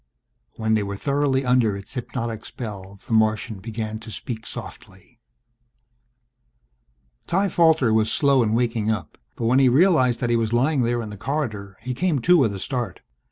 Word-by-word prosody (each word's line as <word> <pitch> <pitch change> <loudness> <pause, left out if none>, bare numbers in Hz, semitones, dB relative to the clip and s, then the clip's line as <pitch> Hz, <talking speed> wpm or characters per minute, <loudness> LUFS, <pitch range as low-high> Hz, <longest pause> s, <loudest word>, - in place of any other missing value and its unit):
When 110 0 0
they 110 - +2
were 100 0 -4
thoroughly 140 +2 0
under 125 -5 +2
its 100 +5 -11
hypnotic 115 -3 -4
spell 100 -4 -8
the 120 - -4
Martian 110 -1 +1
began 110 +1 -5
to 115 - -11
speak 110 0 -6
softly... - - -10 2.1
Ty 195 +3 +1
Falter 160 -9 +3
was 110 0 +2
slow 140 -3 +3
in 110 -1 +1
waking 115 -2 0
up. 110 0 -3 0.2
But 115 - -3
when 125 +4 +4
he 135 -2 +5
realized 130 -5 +4
that 120 -1 0
he - - +3
was 115 -1 0
lying 135 +4 +2
there 120 0 0
in 105 - -7
the 105 - -8
corridor 110 -7 -4
he 125 +2 -4
came 170 +3 0
to 180 +8 +5
with 120 - +3
a - - -6
start. 125 +1 -4
115 Hz, 175 wpm, -23 LUFS, 110-135 Hz, 2.1 s, he